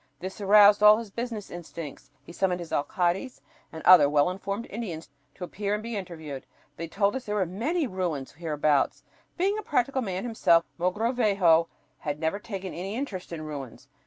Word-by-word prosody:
This 190 +3 -7
aroused 205 +1 +7
all 210 0 +8
his 225 -3 -7
business 230 -2 -5
instincts. 165 -5 -8
He - - -12
summoned 180 0 0
his 170 -2 -8
alcaldes 180 - -1 0.3
and 160 - -9
other 175 -6 +8
well 145 +3 +3
informed 200 +4 -4
Indians 180 -9 -6 0.2
to 185 - -8
appear 200 +3 -2
and 210 - -5
be 230 0 -5
interviewed. 160 -9 -7 0.3
They 165 +2 -5
told 200 +6 0
us 265 - -5
there 210 - -2
were 195 -3 +1
"many 250 - -1
ruins" 175 - -3
hereabouts! 150 -2 0 0.3
Being 395 +4 +1
a - - -3
practical 270 - 0
man 190 -5 -3
himself, 195 -8 +3
Mogrovejo 195 -4 +2 0.3
had 150 -3 -4
never 160 +6 -1
taken 195 -3 -6
any 195 +4 -5
interest 215 -10 -5
in 160 -2 -5
ruins. 140 -3 -8
185 Hz, 175 wpm, -27 LUFS, 165-215 Hz, 0.3 s, all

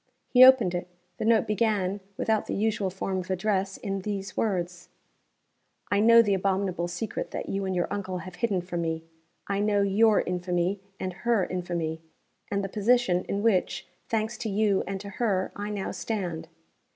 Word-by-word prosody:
He 250 0 +8
opened 255 -8 +7
it. 175 0 -3 0.3
The - - -3
note 225 -1 +4
began, 205 -3 0 0.2
without 220 -1 0
the - - -2
usual 210 -2 0
form 190 0 -3
of 185 +1 -7
address, 195 0 0
in 195 -1 -3
these 195 0 -4
words: 180 -4 -2 1.0
"I 200 - +3
know 230 +2 +7
the 205 -2 +1
abominable 190 -2 0
secret 180 +4 -4
that - - -5
you 195 0 -2
and 190 -1 -2
my 175 - +1
uncle 190 -2 -3
have 180 0 -9
hidden 205 -7 0
from 175 -1 -4
me. 160 -1 -2 0.4
I 200 0 -1
know 205 -1 +2
your 210 +2 +4
infamy, 180 +1 -1 0.2
and 185 -1 -3
her 230 -6 +2
infamy, 170 -3 -3 0.5
and 200 0 -1
the - - -1
position 205 -3 +2
in 200 +1 -2
which, 185 -5 +1 0.2
thanks 225 +1 -1
to 225 - -3
you 205 -1 +2
and 195 0 -3
to 200 - -7
her, 195 -5 +1
I 205 +1 -4
now 205 -2 -3
stand. 180 -7 -4
195 Hz, 175 wpm, -27 LUFS, 180-215 Hz, 1.0 s, He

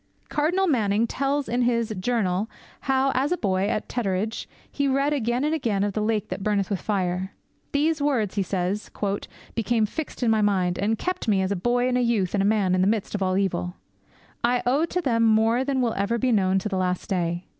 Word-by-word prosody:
Cardinal 350 +6 +1
Manning 225 - +2
tells 275 +4 -1
in 245 +1 0
his 235 -2 +1
Journal 205 -1 0 0.3
how, 270 0 +2
as 270 +4 0
a 360 - +2
boy 190 - 0
at 215 - -2
Tetteridge, 215 -2 -2 0.2
he 280 -1 0
read 275 +2 +2
again 245 -1 0
and 305 +2 +1
again 225 -10 0
of 205 -1 -1
the 215 - -1
lake 215 -1 0
that 185 +2 -4
burneth 205 -1 0
with 195 - -1
fire. 190 -2 -1 0.4
'These 305 +2 +1
words,' 250 -9 +1
he 205 - 0
says, 190 +2 -2 0.6
'became 230 0 +1
fixed 285 +4 -5
in 230 - +3
my 220 -1 +3
mind, 185 -4 +1
and 215 +3 +1
kept 365 0 -3
me 195 -3 +3
as 190 +2 0
boy 240 +6 +1
and 250 0 +1
youth 225 -7 +1
and 200 -2 +2
man 200 -4 +2
in 185 - +2
the 185 - +3
midst 215 -1 0
of 205 - -2
all 185 0 +1
evil. 180 -2 -1 0.7
I 245 +1 +2
owe 275 +6 +3
to 360 +2 -2
them 235 -7 +1
more 225 +2 +3
than 265 -1 0
will 235 -2 +1
ever 200 +4 0
be 255 +1 +1
known 190 -3 +3
to 190 - -1
the 190 - -2
last 180 -1 -1
day.' 175 -2 -1
220 Hz, 210 wpm, -25 LUFS, 195-250 Hz, 0.7 s, in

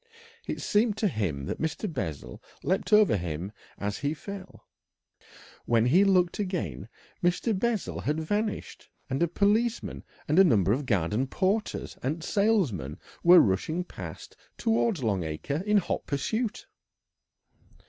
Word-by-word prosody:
It - - -3
seemed 215 0 +2
to 220 - +2
him 90 - -2
that - - -4
Mr. 160 +6 -2
Bessel 85 - -5 0.2
leapt 190 +4 0
over 210 - +6
him 85 +2 -4 0.3
as 100 0 -3
he 145 +2 -1
fell. 195 +2 -9 1.0
When 115 -1 +3
he 170 +11 +5
looked 185 -3 +3
again 175 - -3 0.3
Mr. 175 +6 +2
Bessel 220 +1 -1
had 150 +2 -1
vanished, 205 +7 -3 0.2
and 135 - -1
a 170 - +4
policeman 215 +7 0 0.2
and 155 +5 +3
a - - +9
number 105 - +4
of 135 +2 -2
garden 105 +5 +1
porters 200 +9 -1
and 155 +5 -2
salesmen 165 - +1 0.3
were 175 +1 +9
rushing 135 - 0
past - - -9 0.2
towards 225 - +1
Long 100 -5 +1
Acre 80 - -3
in 210 0 +4
hot 195 - -1
pursuit. 220 - -2
165 Hz, 140 wpm, -28 LUFS, -, 1.0 s, a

